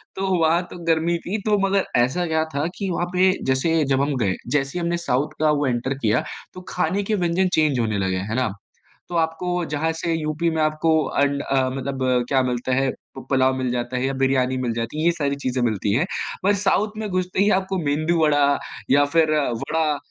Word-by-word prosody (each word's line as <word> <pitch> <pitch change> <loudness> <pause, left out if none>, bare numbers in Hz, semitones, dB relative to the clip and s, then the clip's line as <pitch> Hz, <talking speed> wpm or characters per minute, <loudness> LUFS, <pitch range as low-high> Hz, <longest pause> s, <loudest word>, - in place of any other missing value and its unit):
तो 190 0 -2
वहाँ 165 +2 +3
तो - - -8
गर्मी 165 +1 +2
थी, 205 +4 -1
तो 210 -1 +3
मगर 195 0 +1 0.2
ऐसा 150 +9 0
क्या 160 0 +1
था 145 +2 0
कि 195 -2 -3
वहाँ 175 +1 -1
पे 185 +1 +4 0.2
जैसे 160 +4 +2
जब 135 - +2
हम 140 0 0
गए, 100 -6 0 0.2
जैसे 140 +2 0
ही - - -3
हमने 170 0 0
साउथ 135 +5 +1
का 155 -1 +4
वो 145 -2 +1
एंटर 125 +2 -1
किया, 115 -2 +1 0.3
तो 180 - -9
खाने 180 +3 0
के 215 +2 0
व्यंजन 180 +2 +2
चेंज 150 -5 +2
होने 110 -3 0
लगे। 95 -1 0
है 105 +5 -3
ना? 125 -5 0 0.6
तो 175 - -5
आपको 170 +2 -1
जहाँ 160 +2 0
से, 165 +1 -2
यूपी 155 +1 -1
में 160 -1 -1
आपको 155 +1 +1 0.3
अंड 140 0 +1
अ, 130 -1 +1
मतलब 135 0 -3 0.3
क्या 135 -1 +3
मिलता 125 0 -1
है, 135 0 +1 0.3
पु 135 - -7
पुलाव 130 -1 +3
मिल 130 -1 -1
जाता 120 +1 -2
है 130 - -1
या 135 - -1
बिरयानी 130 -1 +2
मिल 120 -3 -1
जाती 115 +6 -4
है 160 - 0
ये 170 - +5
सारी 140 -4 -1
चीज़ें 130 -2 -2
मिलती 105 -3 0
हैं। 140 +9 +2 0.4
पर 200 +1 +4
साउथ 205 +1 +1
में 215 -1 -3
घुसते 185 0 -2
ही 205 +1 +4
आपको, 190 0 0
मेंदु 155 +4 +1
वड़ा 145 -2 +3 0.3
या 145 +1 +6
फिर 160 -1 +4 0.3
वड़ा, 155 -2 0
150 Hz, 220 wpm, -22 LUFS, 130-170 Hz, 0.6 s, या